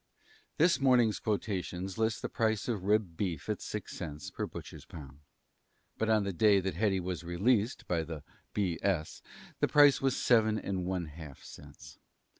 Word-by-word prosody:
This 170 +3 +4
morning's 125 -5 +4
quotations 95 -2 -3
list 110 -1 0
the - - 0
price 110 -2 0
of 105 -6 -2
rib 105 -4 +1
beef 85 -5 -3
at - - -2
six - - -6
cents 75 0 -6
per - - -3
(butcher's) - - -9
pound. 70 -3 -11 0.8
But 110 - 0
on 110 -2 +3
the 100 -1 -2
day 100 +3 +5
that 95 0 -2
Hetty 100 -3 +1
was 90 -1 -4
"released" 105 +7 +1
by 85 -2 +1
the 80 -2 -7 0.3
B. 95 -5 -1
S. 85 -6 -1 0.4
the - - +3
price 145 -1 +6
was 135 -1 +1
seven 110 -3 +3
and 95 -4 -3
one 90 -2 -1
half 75 -3 -11
cents. 75 0 -13
95 Hz, 170 wpm, -31 LUFS, 85-110 Hz, 0.8 s, price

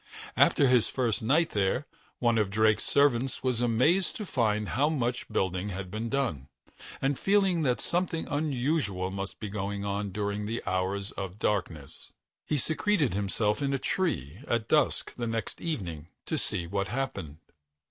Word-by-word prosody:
After 140 - +5
his 125 -3 +4
first 120 -3 0
night 150 +9 +3
there, 105 +7 +1 0.3
one 120 -2 +2
of 105 -2 +1
Drake's 110 +1 +3
servants 135 -3 +2
was 125 -2 +1
amazed 130 - +3
to 215 -4 -4
find 105 - 0
how 140 - +2
much 125 -5 -1
building 95 +1 0
had 95 -1 -5
been 110 +2 -3
done, 120 - -1 0.6
and, 135 0 +1
feeling 195 -4 +3
that 125 -5 +1
something 170 -2 -1
unusual 135 - 0
must 100 0 -5
be 105 - -4
going 100 0 -3
on 100 0 -2
during 105 +1 -2
the 115 +2 -3
hours 95 +2 -1
of 95 0 -6
darkness, 90 -10 -2 0.4
he 150 - +1
secreted 160 - +1
himself 105 +4 0
in 140 -1 +1
a - - +1
tree 95 - -1
at 115 -1 0
dusk 150 -2 +2
the 120 -1 -2
next 115 0 -3
evening 90 - -4 0.2
to - - -2
see 85 - -1
what 100 +2 -1
happened. 105 - -3
115 Hz, 160 wpm, -29 LUFS, 100-140 Hz, 0.6 s, After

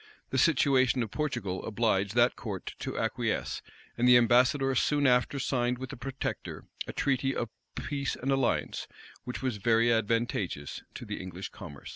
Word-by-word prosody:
The 130 - +1
situation 130 -5 +4
of 110 - -6
Portugal 120 -11 -2
obliged 105 -2 0
that 120 +1 +4
court 100 -5 -5
to - - -4
acquiesce; - - -1 0.3
and 120 +1 +2
the 125 0 +9
ambassador 125 +3 +4
soon 145 +3 +2
after 125 +2 +3
signed, 125 -2 0
with 130 +2 -6
the - - -6
protector, 135 +2 -5 0.2
a - - -3
treaty 135 0 0
of 120 - -2 0.3
peace 140 -2 -2
and 135 +2 -2
alliance, 135 -1 0 0.4
which 125 +1 -5
was 130 -5 -1
very 115 +3 +3
advantageous 110 -9 -1
to - - -7
the - - -5
English 95 +1 -6
commerce. 70 -1 -10
125 Hz, 160 wpm, -30 LUFS, 110-135 Hz, 0.4 s, the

